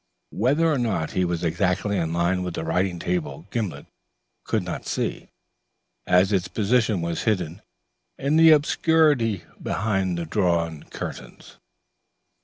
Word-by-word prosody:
Whether 140 +10 +2
or 155 -5 +2
not 95 -10 -1
he 95 - 0
was 85 -1 -2
exactly 90 +4 0
in 80 -4 -1
line 85 +2 +1
with 90 -2 -4
the - - -3
writing 90 +2 0
table 165 - -3
Gimblet 95 - -3 0.6
could - - 0
not - - -6
see, - - -3 0.8
as 90 +2 +4
its 90 -2 +1
position 110 +1 +1
was 85 0 -3
hidden 90 -4 -1 0.6
in 140 +3 0
the 160 0 +7
obscurity 150 - +3 0.2
behind 95 -4 -1
the 85 - -3
drawn 85 -3 0
curtains. - - -8
95 Hz, 135 wpm, -24 LUFS, 85-120 Hz, 0.8 s, the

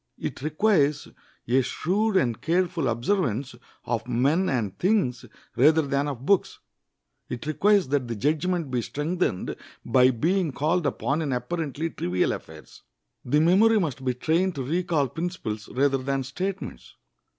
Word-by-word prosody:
It - - -5
requires 155 -1 +1 0.4
a 130 +3 +3
shrewd 195 - 0
and 120 -8 0
careful 170 -3 0
observance 130 - -1 0.3
of 115 -1 -2
men 140 +10 +2
and 110 -7 -1
things 180 - +1 0.3
rather 155 +6 +5
than 140 0 0
of 135 -2 -5
books. 200 +2 +2 0.7
It 120 +2 -5
requires 200 +5 +3
that 140 -3 0
the 115 - -3
judgment 155 - 0
be 125 -2 0
strengthened 150 - -2 0.3
by 125 +2 +5
being 165 +6 0
called 155 +3 +1
upon 145 +2 -1
in 150 -3 -2
apparently 150 +5 -3
trivial 90 +1 0
affairs. 80 -1 -9 0.4
The 150 +5 +2
memory 210 +7 +5
must 145 -7 -3
be 125 -1 0
trained 170 +8 +1
to 135 - -3
recall 165 0 0
principles 125 - -5
rather 135 +1 +1
than 135 +1 -1
statements. 185 - -5
145 Hz, 140 wpm, -25 LUFS, 125-175 Hz, 0.7 s, rather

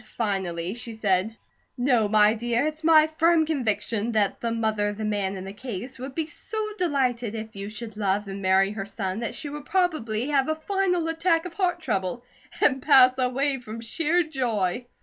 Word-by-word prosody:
Finally 190 -5 -2
she 235 0 -6
said: 210 +1 0 0.4
"No, 245 -4 +2
my 210 0 +5
dear. 240 +3 0
It's 310 +1 -4
my 315 -1 +7
firm 320 +1 +3
conviction 235 -6 -1
that 210 -2 +1
the 235 - -1
mother 220 -2 0
of 205 0 -4
the 215 - -3
man 200 -2 -1
in 190 0 -6
the 195 - -7
case 245 +2 -7
would 265 +1 -7
be 320 - -1
so 440 +7 -7 0.2
delighted 250 - 0
if 220 -1 -7
you 200 +1 -6
should 220 0 -8
love 205 0 0
and 195 0 -6
marry 190 +1 +3
her 200 -2 -5
son 195 -1 -3
that 230 - -4
she 310 - -6
would 290 0 -7
probably 295 - 0
have 275 -1 +2
a 315 - +1
final 360 0 0
attack 330 +1 +1
of 360 - -6
heart 355 -2 0
trouble 195 - -2 0.4
and 265 -2 +3
pass 255 -3 +7
away 270 +2 +1
from 230 -2 -8
sheer 325 +9 +1
joy." 245 - -1
235 Hz, 190 wpm, -25 LUFS, 210-300 Hz, 0.4 s, my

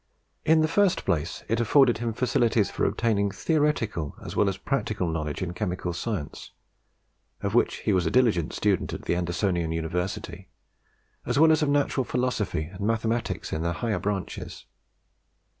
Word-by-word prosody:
In 160 0 +5
the 155 - +3
first 185 +2 +2
place 80 +1 -1
it 115 +1 0
afforded 120 0 +4
him 120 -1 -1
facilities 115 -3 +1
for - - -1
obtaining 105 -3 +1
theoretical 115 - 0
as - - -6
well 105 - +3
as 95 - -4
practical 110 -9 -1
knowledge 80 +1 -2
in 90 -1 -4
Chemical 90 0 -3
Science, 90 -5 -5 0.9
of - - -2
which - - +2
he - - +3
was 90 -3 +2
a - - +2
diligent 105 -10 +2
student 100 -4 0
at - - -6
the - - 0
Andersonian 85 -1 0
University, 90 +2 -3 0.7
as - - -1
well 160 +2 +7
as 155 - +3
of 150 - +2
Natural 145 -2 +1
Philosophy 125 -10 -1
and 90 +5 -10
Mathematics 115 +2 -1
in 80 - -1
their 85 +1 0
higher 110 +3 -1
branches. 100 -2 -4
105 Hz, 160 wpm, -26 LUFS, 90-125 Hz, 0.9 s, well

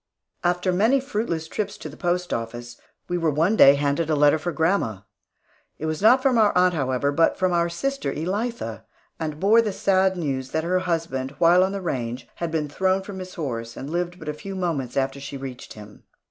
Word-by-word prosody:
After 180 +1 +1
many 225 +9 +3
fruitless 210 - -3
trips 210 +5 -4
to - - -8
the 150 - -10
post 180 +2 -1
office, 120 +1 -5 0.3
we 175 0 -1
were 165 -1 +1
one 165 +8 +2
day 140 -8 +8
handed 145 +3 0
a 155 - +2
letter 145 +1 +4
for 175 +3 -3
grandma. 160 - 0 0.8
It 155 - -5
was 155 +1 -2
not 250 +5 +5
from 260 -4 +3
our 210 -2 +5
aunt, 180 0 +4
however, 135 -2 0
but 165 +3 +2
from 185 -1 +1
our 170 0 +2
sister 275 +11 -2
Elitha, 210 +9 -3 0.4
and 155 -2 -4
bore 215 +5 +5
the 215 -2 -2
sad 190 -1 +2
news 135 -5 -2
that 160 - 0
her 180 +2 +1
husband, 160 -7 -2
while 175 +3 +5
on 190 - 0
the 200 0 -4
range, 125 -7 -3
had 170 - -2
been 160 -2 -1
thrown 190 +5 0
from 195 -1 -8
his 185 0 -8
horse, 115 -8 -4
and 140 +3 -6
lived 175 +1 -2
but 155 - -11
a 150 - -1
few 195 +6 -8
moments 160 -10 -2
after 135 0 0
she 135 0 -7
reached 130 -2 -8
him. 105 -1 -13
165 Hz, 210 wpm, -24 LUFS, 140-185 Hz, 0.8 s, day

